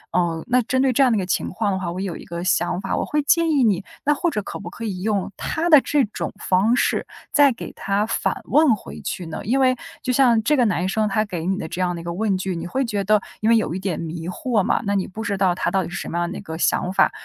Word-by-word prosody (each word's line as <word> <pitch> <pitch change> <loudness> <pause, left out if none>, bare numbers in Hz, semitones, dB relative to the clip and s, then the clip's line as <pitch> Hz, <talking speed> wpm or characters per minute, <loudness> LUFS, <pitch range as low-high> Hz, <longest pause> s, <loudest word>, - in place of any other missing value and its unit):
嗯， 170 -2 0
那 250 +1 +3
针 260 +3 -1
对 265 -1 +2
这 260 - +2
样 260 -2 +5
的 225 - +2
一 - - +1
个 190 - -2
情 180 - -1
况 205 +1 -1
的 190 - -1
话， 175 -2 -3
我 180 - -5
有 185 -4 -4
一 - - -11
个 170 0 -5
想 185 0 +1
法， 195 - -2
我 - - -1
会 300 - 0
建 335 +3 +3
议 285 -4 +3
你， 205 -4 +2 0.2
那 295 - +3
或 340 +4 0
者 215 -9 -2
可 - - -7
不 - - -7
可 230 - -9
以 195 -5 -4
用 205 -3 -1
他 330 +2 -1
的 305 -3 +9
这 290 0 +2
种 210 - -5
方 195 +6 +2
式， - - 0 0.2
再 290 -2 +6
给 - - -8
他 200 +1 -1
反 225 - -1
问 295 -4 +4
回 - - -10
去 180 - -4
呢？ 160 - -5
因 240 +6 +1
为 255 -1 +4 0.3
就 255 - -1
像 245 -3 +4
这 300 +4 +2
个 245 - +4
男 185 -3 0
生 215 +2 +1
他 215 +1 +1
给 175 -6 -5
你 190 0 0
的 - - -4
这 180 - -5
样 180 -1 0
的 170 - -6
一 - - -11
个 170 - -4
问 200 +1 0
句， 185 0 -3
你 165 - -5
会 265 +9 -1
觉 210 -5 -2
得 210 +1 +4 0.2
因 215 - +1
为 230 - +6
有 220 -7 +1
一 185 - -3
点 185 -4 -2
迷 165 0 -5
惑 220 +4 0
嘛， - - +1
那 200 0 0
你 195 - 0
不 215 +4 -7
知 205 -3 -2
道 190 -2 +2
他 175 - -1
到 195 - +2
底 - - -6
是 175 - -7
什 - - -5
么 170 - -3
样 175 0 -1
的 185 - -6
一 - - -7
个 160 -5 -7
想 180 +2 +1
法。 190 - +3
200 Hz, 325 characters per minute, -22 LUFS, 180-245 Hz, 0.3 s, 的